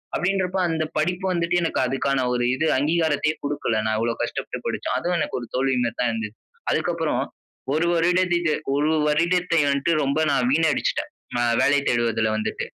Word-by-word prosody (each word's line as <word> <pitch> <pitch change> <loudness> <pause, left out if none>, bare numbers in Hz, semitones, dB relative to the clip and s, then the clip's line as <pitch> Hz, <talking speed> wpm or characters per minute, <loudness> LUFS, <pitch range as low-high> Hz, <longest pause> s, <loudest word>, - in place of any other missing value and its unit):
அப்டின்றப்போ 190 0 0
அந்த 160 -1 0
படிப்பு 180 +4 0
வந்துட்டு 170 0 +1
எனக்கு 165 - -1
அதுக்கான 135 0 0
ஒரு 120 0 0
இது 155 - -1
அங்கீகாரத்தையே 155 +1 +1
குடுக்கல, 145 -5 -1
நான் 110 0 +1
இவ்ளோ 115 +1 0
கஷ்டப்பட்டு - - -5
படிச்சும். - - -2
அதுவும் 175 0 0
எனக்கு - - -2
ஒரு 120 - -8
தோல்வி 130 0 +1
மேரிதான் 120 +1 -1
இருந்துச்சு. 110 -1 -5 0.3
அதுக்கு - - +1
அப்புறம் - - 0 0.5
ஒரு 165 +2 +1
வருடத்தை 175 -1 +2 0.2
ஒரு 150 +2 +2 0.2
வருடத்தை 170 +3 +2
வந்துட்டு 140 +4 +1
ரொம்ப 140 +2 0
நான் 125 -3 +2
வீணடிச்சுட்டேன். 155 -1 +1 0.3
அ - - +2 0.2
வேலை 145 +1 +4
தேடுவதுல 115 -2 +1
வந்துட்டு. 110 - -3
150 Hz, 160 wpm, -23 LUFS, 125-170 Hz, 0.5 s, வேலை